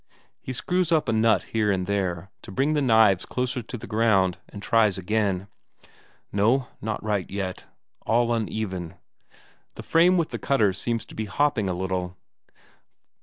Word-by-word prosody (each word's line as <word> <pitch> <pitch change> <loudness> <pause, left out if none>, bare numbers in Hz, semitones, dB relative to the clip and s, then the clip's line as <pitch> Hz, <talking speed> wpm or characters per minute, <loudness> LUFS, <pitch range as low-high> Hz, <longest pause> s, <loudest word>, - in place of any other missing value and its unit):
He - - -6
screws 180 +7 -1
up 155 -4 +2
a 115 - +1
nut 110 0 +3
here 105 -2 +2
and 95 -2 -1
there 95 -2 -2
to 110 - -10
bring 135 +9 +1
the 150 - +1
knives 110 -7 +4
closer 125 0 -2
to 120 +2 -7
the - - -9
ground, 105 -5 +2
and 100 - -9
tries 105 -2 +2
again. 100 -1 0 0.9
No, 115 +6 +2
not 110 0 -3
right 105 -3 -1
yet, 95 -2 -4 0.4
all 120 +1 +2
uneven; 100 -6 -3 0.8
the - - -8
frame 175 +3 +4
with 165 -2 0
the - - -5
cutters 105 -8 +1
seems 115 -2 -2
to - - -14
be 110 - -3
hopping 115 -2 0
a 90 - -1
little. 90 -1 -3
110 Hz, 165 wpm, -25 LUFS, 95-120 Hz, 0.9 s, knives